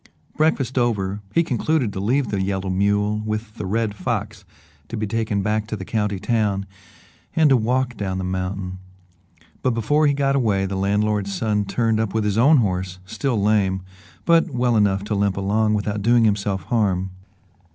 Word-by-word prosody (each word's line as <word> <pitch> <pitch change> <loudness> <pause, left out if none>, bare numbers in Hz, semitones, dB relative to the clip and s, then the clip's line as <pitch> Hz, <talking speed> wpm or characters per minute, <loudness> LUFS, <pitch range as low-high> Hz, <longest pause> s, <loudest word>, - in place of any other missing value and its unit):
Breakfast 135 -5 +1
over, 105 -4 0
he 170 - +3
concluded 130 -4 0
to - - -4
leave 120 +5 +1
the 100 -2 -1
yellow 95 0 -2
mule 100 +2 +1
with 110 0 -4
the 100 - -4
Red 110 +1 0
Fox 105 -2 -3 0.4
to 115 - -5
be 110 - -1
taken 105 -2 -1
back 105 +1 0
to 110 - -3
the 95 -2 -7
county 105 -2 -1
town, 105 -2 0 0.7
and 155 -3 +4
to - - +7
walk 125 +1 0
down 95 -2 -2
the 95 - -3
mountain, 95 0 -3 0.8
but 125 -3 +1
before 145 +7 +2
he 145 - +3
got 140 -1 +1
away 105 -7 +1
the 95 0 -3
landlord's 100 +1 0
son 105 0 0
turned 110 +2 0
up 110 -2 -2
with 110 - +1
his 105 +1 0
own 145 +6 +6
horse, 95 -5 -1
still 120 +4 -1
lame, 100 -2 +1 0.4
but 170 +1 +4
well 125 -3 +1
enough 100 -2 +2
to 105 +1 -3
limp 100 -1 +1
along 105 +2 +1
without 105 0 -2
doing 115 +2 +4
himself 100 -2 0
harm. 95 -5 0
105 Hz, 180 wpm, -22 LUFS, 100-115 Hz, 0.8 s, to